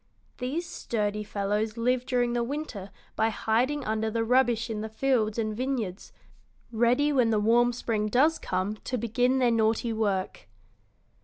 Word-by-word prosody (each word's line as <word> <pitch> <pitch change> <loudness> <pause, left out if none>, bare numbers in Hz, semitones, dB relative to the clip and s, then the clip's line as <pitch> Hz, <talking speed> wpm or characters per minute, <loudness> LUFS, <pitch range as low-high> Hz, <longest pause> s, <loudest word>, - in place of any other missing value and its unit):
These 290 +7 -3
sturdy 210 -6 -2
fellows 210 +2 -2
live 250 +2 0
during 245 -2 +1
the 240 -1 0
winter 240 -7 -5 0.3
by 220 - +2
hiding 250 +6 0
under 220 +1 -1
the 225 +1 -1
rubbish 240 -1 +2
in 220 -2 -4
the 220 - -5
fields 220 -2 0
and 215 -2 -1
vineyards, 235 -7 -3 0.6
ready 245 +6 +2
when 250 -4 +3
the 215 -2 +2
warm 235 +3 +4
spring 225 -3 -2
does 280 +9 +3
come 190 +3 -2
to 250 - -4
begin 245 +3 +1
their 250 -2 +3
naughty 225 +1 +1
work." 200 - -2
230 Hz, 155 wpm, -27 LUFS, 215-250 Hz, 0.6 s, warm